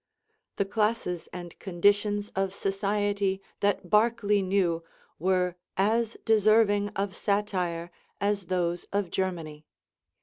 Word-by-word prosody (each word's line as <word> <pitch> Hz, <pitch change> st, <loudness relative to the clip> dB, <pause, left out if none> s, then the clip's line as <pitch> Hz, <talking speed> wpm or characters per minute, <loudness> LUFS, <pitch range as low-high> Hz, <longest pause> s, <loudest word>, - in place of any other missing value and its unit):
The 200 Hz, -, 0 dB
classes 210 Hz, -4 st, -1 dB
and 175 Hz, -1 st, -8 dB
conditions 205 Hz, +3 st, +1 dB
of 195 Hz, 0 st, -1 dB
society 200 Hz, 0 st, 0 dB, 0.2 s
that 200 Hz, -2 st, 0 dB
Barclay 210 Hz, 0 st, +3 dB
knew 185 Hz, -3 st, +1 dB, 0.4 s
were 180 Hz, 0 st, +1 dB, 0.2 s
as 225 Hz, +4 st, +1 dB
deserving 215 Hz, -1 st, +4 dB
of 195 Hz, -1 st, -2 dB
satire 180 Hz, -5 st, -1 dB, 0.3 s
as 200 Hz, -2 st, 0 dB
those 175 Hz, -1 st, -1 dB
of 200 Hz, -3 st, -1 dB
Germany. 165 Hz, -5 st, -3 dB
195 Hz, 105 wpm, -28 LUFS, 180-205 Hz, 0.4 s, deserving